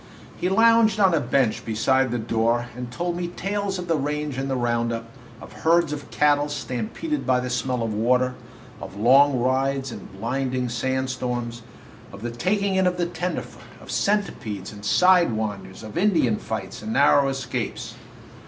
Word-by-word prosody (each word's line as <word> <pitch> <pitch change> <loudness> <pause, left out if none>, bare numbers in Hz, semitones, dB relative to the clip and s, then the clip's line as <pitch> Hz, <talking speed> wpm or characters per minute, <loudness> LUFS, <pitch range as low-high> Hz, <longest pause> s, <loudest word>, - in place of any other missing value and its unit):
He 180 - -1
lounged 225 +1 +4
on 190 -3 +5
a 165 - +3
bench 130 -6 +1
beside 130 +4 +1
the 120 - -1
door 115 +1 0
and 125 -1 -6
told 175 +5 -2
me 175 0 -3
tales 195 +2 -3
of 180 -1 -6
the 165 - +2
range 150 0 -2
and 135 +1 -3
the 135 - 0
round 120 -1 0
up, 115 0 -4 0.3
of - - -12
herds 165 -1 +2
of 145 -1 -7
cattle 145 0 +2
stampeded 145 - -3
by 130 -1 +2
the 125 0 -3
smell 125 -1 -1
of 110 -1 -2
water, 125 +4 +2 0.5
of - - -8
long 135 +4 +5
rides 135 +2 0
in 100 - -8
blinding 125 +3 -2
sand 130 +2 -1
storms, 120 -2 -4 0.5
of 100 +2 -11
the 120 - -3
taking 195 - 0
in 190 -1 +3
of 180 0 0
the 175 - +1
tenderfoot, 175 +1 -4 0.2
of - - -10
centipedes 115 - -1
and 100 -1 -11
side 180 - +4
winders, 105 -2 -4
of 110 - -9
Indian 165 - +3
fights 95 -4 -5
and 110 +1 -4
narrow 140 0 +5
escapes. 130 -4 -4
130 Hz, 175 wpm, -24 LUFS, 120-170 Hz, 0.5 s, on